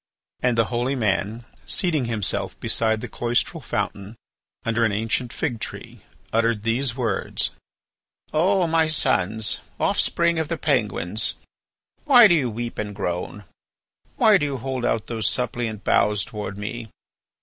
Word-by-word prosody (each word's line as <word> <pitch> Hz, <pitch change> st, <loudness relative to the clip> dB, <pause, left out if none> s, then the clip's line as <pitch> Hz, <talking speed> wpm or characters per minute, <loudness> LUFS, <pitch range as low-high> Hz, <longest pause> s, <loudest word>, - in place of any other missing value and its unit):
And 125 Hz, -2 st, +1 dB
the 115 Hz, -, +4 dB
holy 125 Hz, +3 st, 0 dB
man, 110 Hz, 0 st, -1 dB, 0.2 s
seating 160 Hz, -8 st, +1 dB
himself 110 Hz, -4 st, -2 dB
beside 110 Hz, -1 st, +1 dB
the -, -, -5 dB
cloistral 120 Hz, 0 st, -1 dB
fountain 100 Hz, +2 st, -3 dB, 0.5 s
under 115 Hz, 0 st, +1 dB
an 110 Hz, -, +3 dB
ancient 115 Hz, +3 st, -1 dB
fig 125 Hz, -8 st, -2 dB
tree, -, -, -8 dB, 0.3 s
uttered 115 Hz, -2 st, +1 dB
these 120 Hz, +2 st, 0 dB
words: 120 Hz, -3 st, -1 dB, 0.8 s
"O 180 Hz, +4 st, +3 dB
my 165 Hz, -1 st, +3 dB
sons, 110 Hz, -, +1 dB, 0.2 s
offspring 170 Hz, -1 st, +2 dB
of 160 Hz, -, -1 dB
the 165 Hz, +1 st, -2 dB
Penguins, 110 Hz, -, 0 dB, 0.7 s
why 245 Hz, -6 st, +9 dB
do 185 Hz, -, +4 dB
you 140 Hz, -7 st, +2 dB
weep 120 Hz, +2 st, -5 dB
and 105 Hz, -1 st, -4 dB
groan? 90 Hz, +1 st, -3 dB, 0.7 s
Why 215 Hz, -3 st, +5 dB
do 145 Hz, -, 0 dB
you 140 Hz, -1 st, -3 dB
hold 130 Hz, 0 st, -3 dB
out 115 Hz, -2 st, 0 dB
those 115 Hz, -2 st, 0 dB
suppliant 120 Hz, -3 st, -2 dB
boughs 105 Hz, -1 st, +2 dB
towards 105 Hz, -3 st, -6 dB
me? 110 Hz, +2 st, -5 dB
115 Hz, 140 wpm, -23 LUFS, 105-140 Hz, 0.8 s, why